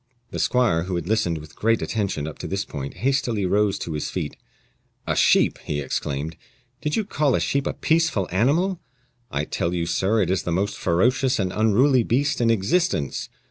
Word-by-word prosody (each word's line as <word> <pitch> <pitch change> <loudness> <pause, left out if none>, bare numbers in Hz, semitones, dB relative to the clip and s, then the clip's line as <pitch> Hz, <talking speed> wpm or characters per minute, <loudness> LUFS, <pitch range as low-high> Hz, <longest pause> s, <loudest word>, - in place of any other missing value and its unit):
The - - -4
squire, 105 -10 +2
who 90 -1 -3
had 85 -1 -3
listened 105 -6 +1
with 75 -1 -11
great 115 +1 +2
attention 100 -9 -2
up 80 - -8
to - - -5
this 100 +1 -2
point, 70 -1 -6
hastily 120 -7 +1
rose 100 +1 +2
to 80 - -5
his 75 - -3
feet. - - -4 0.7
"A - - 0
sheep!" - - +4
he 75 - -3
exclaimed; 75 +2 -3 0.4
"did 150 - -1
you 220 - 0
call 150 -8 +1
a - - +1
sheep 140 0 0
a - - -1
peaceful 160 - +1
animal? 160 - +1 0.5
I 70 +1 -2
tell 85 +3 -2
you, 85 -1 -1
sir, 95 +6 +1
it 90 - -1
is 95 - +1
the 85 - -3
most 100 +4 0
ferocious 125 +9 +2
and 95 -3 -1
unruly 120 +5 +4
beast 135 +5 0
in 115 - +3
existence. 115 - 0
105 Hz, 190 wpm, -23 LUFS, 85-130 Hz, 0.7 s, sheep